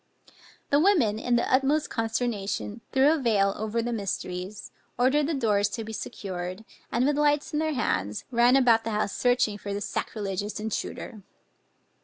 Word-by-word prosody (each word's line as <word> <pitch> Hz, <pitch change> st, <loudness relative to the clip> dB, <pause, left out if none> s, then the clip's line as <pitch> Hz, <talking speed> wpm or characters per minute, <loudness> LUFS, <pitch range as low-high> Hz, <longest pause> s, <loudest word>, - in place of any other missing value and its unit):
The 285 Hz, -, +5 dB
women 300 Hz, -, +3 dB
in 245 Hz, +1 st, +1 dB
the 235 Hz, -, +2 dB
utmost 280 Hz, +3 st, +2 dB
consternation, 225 Hz, -2 st, -2 dB
threw 270 Hz, +3 st, +5 dB
a 320 Hz, -, +1 dB
veil 200 Hz, -6 st, +2 dB
ever 220 Hz, +2 st, -1 dB
the 240 Hz, 0 st, -2 dB
mysteries, 195 Hz, -1 st, -4 dB, 0.3 s
ordered 275 Hz, +4 st, +3 dB
the 325 Hz, -, -1 dB
doors 210 Hz, -5 st, +2 dB
to 225 Hz, +2 st, -4 dB
be 220 Hz, +1 st, -7 dB
secured, 185 Hz, 0 st, -5 dB, 0.3 s
and 245 Hz, +2 st, +2 dB
with 290 Hz, +1 st, +1 dB
lights 295 Hz, 0 st, +2 dB
in 300 Hz, -, +1 dB
their 315 Hz, 0 st, 0 dB
hands, 105 Hz, -, -1 dB
ran 240 Hz, +1 st, +5 dB
about 235 Hz, -4 st, +5 dB
the 225 Hz, -, -3 dB
house 210 Hz, -2 st, -1 dB
searching 245 Hz, -4 st, +1 dB
for 200 Hz, 0 st, -4 dB
the -, -, -2 dB
sacrilegious 205 Hz, 0 st, -3 dB
intruder. 215 Hz, 0 st, -5 dB
225 Hz, 165 wpm, -27 LUFS, 205-265 Hz, 0.3 s, The